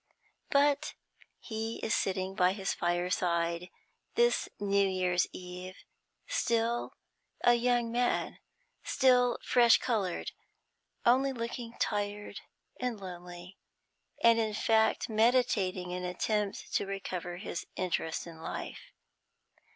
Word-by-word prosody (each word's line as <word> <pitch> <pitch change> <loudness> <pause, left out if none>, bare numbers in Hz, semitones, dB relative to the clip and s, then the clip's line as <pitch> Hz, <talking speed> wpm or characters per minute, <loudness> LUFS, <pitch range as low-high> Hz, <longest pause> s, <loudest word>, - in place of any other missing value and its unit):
But 285 0 +2 0.4
he 225 0 -4
is 220 - +1
sitting 190 0 0
by 185 -1 +3
his 195 -1 -2
fireside 175 -1 0 0.5
this 475 +1 +3
New 200 -1 +2
Year's 185 -1 +1
Eve, 180 +1 -8 0.5
still 235 - 0 0.5
a 240 - +6
young 240 -1 +2
man, 245 +1 0 0.4
still 250 -2 +3
fresh 240 -2 +6
coloured, 205 -8 -1 0.7
only 265 +3 +4
looking 235 -1 -5
tired 205 -1 -2 0.4
and 250 -4 -2
lonely, 180 0 -9 0.6
and, 230 0 +6
in 215 -2 0
fact, 220 0 +2
meditating 215 -6 +2
an 180 0 -4
attempt 200 +3 -2
to - - +1
recover 185 -2 -4
his 180 -2 -5
interest 175 -3 -2
in 165 -2 -11
life. - - -6
205 Hz, 105 wpm, -31 LUFS, 180-235 Hz, 0.7 s, a